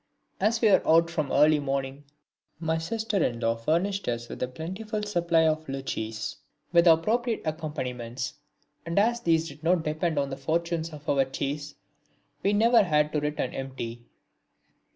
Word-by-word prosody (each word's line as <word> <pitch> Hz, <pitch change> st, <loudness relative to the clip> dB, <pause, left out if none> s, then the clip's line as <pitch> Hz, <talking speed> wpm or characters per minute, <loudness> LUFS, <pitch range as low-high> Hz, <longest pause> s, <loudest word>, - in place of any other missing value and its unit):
As 220 Hz, +4 st, +1 dB
we 220 Hz, -3 st, +5 dB
were 190 Hz, -, +6 dB
out 165 Hz, +1 st, +4 dB
from 155 Hz, -5 st, -2 dB
early 150 Hz, 0 st, +5 dB
morning, 135 Hz, 0 st, -3 dB, 0.5 s
my 160 Hz, -1 st, 0 dB
sister 215 Hz, +2 st, -1 dB
in 120 Hz, -1 st, -1 dB
law 115 Hz, 0 st, +1 dB
furnished 170 Hz, +11 st, 0 dB
us 120 Hz, 0 st, -2 dB
with -, -, -8 dB
a 125 Hz, -, 0 dB
plentiful 190 Hz, -, -5 dB
supply 170 Hz, -5 st, +2 dB
of 155 Hz, 0 st, -1 dB
luchis 110 Hz, -5 st, -4 dB, 0.4 s
with 170 Hz, 0 st, +6 dB
appropriate 220 Hz, +9 st, +3 dB
accompaniments; 130 Hz, -6 st, -4 dB, 0.5 s
and 170 Hz, +2 st, -4 dB
as 235 Hz, +4 st, +3 dB
these 165 Hz, -3 st, +2 dB
did 140 Hz, 0 st, -11 dB
not 170 Hz, 0 st, +2 dB
depend 155 Hz, +1 st, -1 dB
upon 140 Hz, -1 st, 0 dB
the 135 Hz, -, -4 dB
fortunes 165 Hz, +3 st, -1 dB
of 150 Hz, -2 st, -12 dB
our 135 Hz, -1 st, +3 dB
chase 145 Hz, +2 st, -4 dB, 0.7 s
we 200 Hz, -, +2 dB
never 230 Hz, +3 st, +5 dB
had 150 Hz, -5 st, +2 dB
to 150 Hz, -, 0 dB
return 150 Hz, 0 st, -2 dB
empty. 125 Hz, -3 st, -5 dB
160 Hz, 160 wpm, -27 LUFS, 135-175 Hz, 0.7 s, were